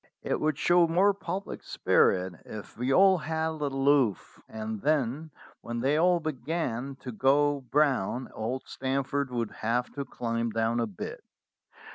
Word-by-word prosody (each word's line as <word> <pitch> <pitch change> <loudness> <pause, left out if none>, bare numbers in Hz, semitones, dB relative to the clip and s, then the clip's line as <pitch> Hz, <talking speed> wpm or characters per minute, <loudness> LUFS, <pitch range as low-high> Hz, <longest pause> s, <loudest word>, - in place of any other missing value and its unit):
It - - -1
would 155 -2 0
show 175 +1 +4
more 190 +5 +4
public 195 0 -5
spirit 90 0 +2
if 105 -1 -9
we 125 +3 -1
all 190 +3 +6
held 160 0 -2
aloof, 135 - +1
and 110 -1 -5
then, 150 +1 0 0.3
when 120 0 -4
they 135 +4 +2
all 175 +2 +4
began 140 -4 -3
to 125 - -6
go 140 +4 +2
brown, 130 -4 +1
old 120 +4 -3
Stan 135 +1 -2
forth 140 0 -2
would 120 -3 -2
have 120 +3 -2
to 140 - -3
climb 115 -3 -2
down 115 +1 0
a 115 - 0
bit. 100 -4 -7
135 Hz, 150 wpm, -28 LUFS, 115-155 Hz, 0.3 s, all